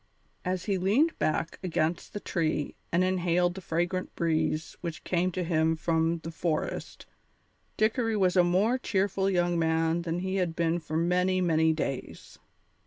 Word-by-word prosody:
As 185 -1 -2
he 195 -3 0
leaned 245 - +2
back 165 +2 -1
against 165 -2 -1
the 205 - -3
tree 155 -6 -1 0.2
and 175 +2 +3
inhaled 180 -1 +1
the 190 - -8
fragrant 175 +2 -2
breeze 160 -2 0
which 170 -2 -5
came 180 +1 0
to 185 - -1
him 160 -1 +2
from 165 +1 0
the 165 - -5
forest, 165 -1 -3 0.7
Dickory 225 0 +1
was 185 -2 +2
a 180 - +6
more 200 +9 +2
cheerful 195 -3 0
young 175 -2 +1
man 160 +1 +1
than 170 +1 -2
he 190 +1 -1
had 175 -3 0
been 170 0 +1
for 160 -1 -4
many, 180 +2 +2
many 160 -3 +3
days. 140 -4 -5
175 Hz, 160 wpm, -28 LUFS, 165-185 Hz, 0.7 s, a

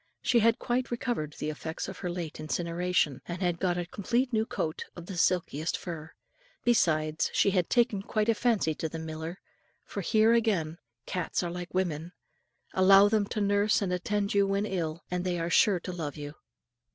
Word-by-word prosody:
She 240 - +4
had 230 +1 +4
quite 250 +1 -1
recovered 235 - -2
the 155 - -3
effects 160 +2 -5
of 190 -1 -8
her 180 - -3
late 175 -4 -5
incineration; 170 -2 0
and 175 0 -4
had 175 -3 0
got 180 -2 +1
a 175 - -2
complete 240 +8 -1
new 220 0 +1
coat 155 0 -3
of 175 - -9
the 190 - -7
silkiest 170 -3 +1
fur. 160 -3 -7 0.5
Besides, 155 -9 +2
she 200 - +4
had 180 -3 +1
taken 230 -5 +2
quite 215 +1 -1
a 230 - +5
fancy 220 -8 +1
to 160 +1 -4
the 165 - -6
miller, 160 +2 -6 0.5
for - - -5
here 220 +1 +4
again 190 -9 +1 0.3
cats 180 0 -2
are 175 - -2
like 180 +1 -7
women: 175 -2 -1 0.6
allow 195 +2 +7
them 210 -2 +2
to 215 - -2
nurse 205 +1 +3
and 180 -2 -1
attend 200 +3 -1
you 200 -1 +4
when 200 +1 0
ill, 170 -5 -3
and 180 0 -1
they 180 -1 -1
are 170 0 -2
sure 195 0 +4
to 185 - -5
love 155 -4 -5
you. 145 0 -6
180 Hz, 190 wpm, -29 LUFS, 165-205 Hz, 0.6 s, allow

